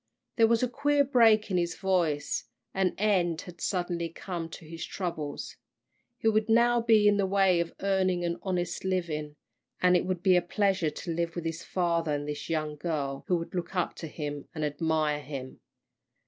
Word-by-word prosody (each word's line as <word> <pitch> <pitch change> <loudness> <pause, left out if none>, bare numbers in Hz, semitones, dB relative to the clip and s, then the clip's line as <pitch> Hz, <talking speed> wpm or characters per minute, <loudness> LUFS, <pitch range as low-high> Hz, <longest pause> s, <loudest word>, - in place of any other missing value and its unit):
There 225 -1 +6
was 230 +1 +2
a - - +3
queer 285 +3 +2
break 225 -6 +4
in 185 - +2
his 170 -1 0
voice. 170 -7 0 0.3
An 190 -1 +1
end 185 -5 +1
had 175 -2 -12
suddenly 175 -3 -1
come 170 0 -5
to 160 - -10
his 165 +1 -7
troubles. 165 -6 -5 0.6
He 225 - -1
would 215 0 +2
now 235 +1 +4
be 220 -2 +5
in 205 0 +4
the 195 -1 +1
way 190 -2 +3
of 170 -1 -2
earning 185 -2 +1
an 170 0 -2
honest 180 -2 -2
living. 165 -6 -2 0.4
And 180 0 +4
it 175 - +2
would 180 -2 -2
be 185 -1 +5
a 180 - +4
pleasure 190 -2 +1
to 165 +3 -5
live 170 0 -2
with 170 -1 -4
his 165 0 -3
father 170 -4 0
and 145 0 -4
this 150 0 -5
young 155 -2 -2
girl 145 -4 -3
who 180 - +2
would 165 - -6
look 175 +1 -4
up 180 -2 0
to 165 - -6
him 145 -2 -5
and 155 -1 -1
admire 155 0 0
him. 135 -2 -7
175 Hz, 190 wpm, -29 LUFS, 160-195 Hz, 0.6 s, There